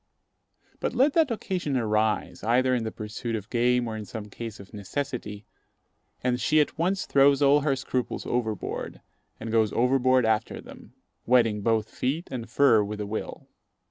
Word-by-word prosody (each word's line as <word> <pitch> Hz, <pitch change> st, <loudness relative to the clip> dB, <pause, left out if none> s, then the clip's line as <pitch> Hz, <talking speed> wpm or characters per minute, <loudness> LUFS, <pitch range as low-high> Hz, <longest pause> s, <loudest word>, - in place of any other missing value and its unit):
But -, -, -2 dB
let 270 Hz, +4 st, +4 dB
the 320 Hz, -6 st, +3 dB
occasion 180 Hz, -, -2 dB
arise, 110 Hz, -4 st, 0 dB
either 125 Hz, +4 st, +2 dB
in 120 Hz, -3 st, 0 dB
the 110 Hz, -, -3 dB
pursuit 110 Hz, +2 st, -5 dB
of 105 Hz, -1 st, -7 dB
game 125 Hz, 0 st, +2 dB
or 110 Hz, -, -4 dB
in 110 Hz, -, -5 dB
some 105 Hz, -1 st, -8 dB
case 115 Hz, -1 st, -7 dB
of 100 Hz, +2 st, -13 dB
necessity, 105 Hz, -1 st, -5 dB, 0.8 s
and 125 Hz, 0 st, 0 dB
she 155 Hz, +7 st, +3 dB
at 150 Hz, -, +1 dB
once 185 Hz, +4 st, 0 dB
throws 140 Hz, 0 st, +4 dB
all 140 Hz, +1 st, +6 dB
her 140 Hz, -1 st, +1 dB
scruples 130 Hz, -2 st, -3 dB
overboard, 110 Hz, -4 st, -3 dB, 0.4 s
and 115 Hz, -, -5 dB
goes 110 Hz, -2 st, +2 dB
overboard 130 Hz, 0 st, +3 dB
after 110 Hz, 0 st, 0 dB
them, -, -, -13 dB, 0.3 s
wetting 115 Hz, -4 st, +3 dB
both 110 Hz, 0 st, +1 dB
feet 145 Hz, +10 st, -3 dB
and 120 Hz, -3 st, -5 dB
fur 120 Hz, -4 st, +4 dB
with 105 Hz, +1 st, -5 dB
a 105 Hz, -, -3 dB
will. 105 Hz, +2 st, -6 dB
120 Hz, 170 wpm, -26 LUFS, 110-135 Hz, 0.8 s, all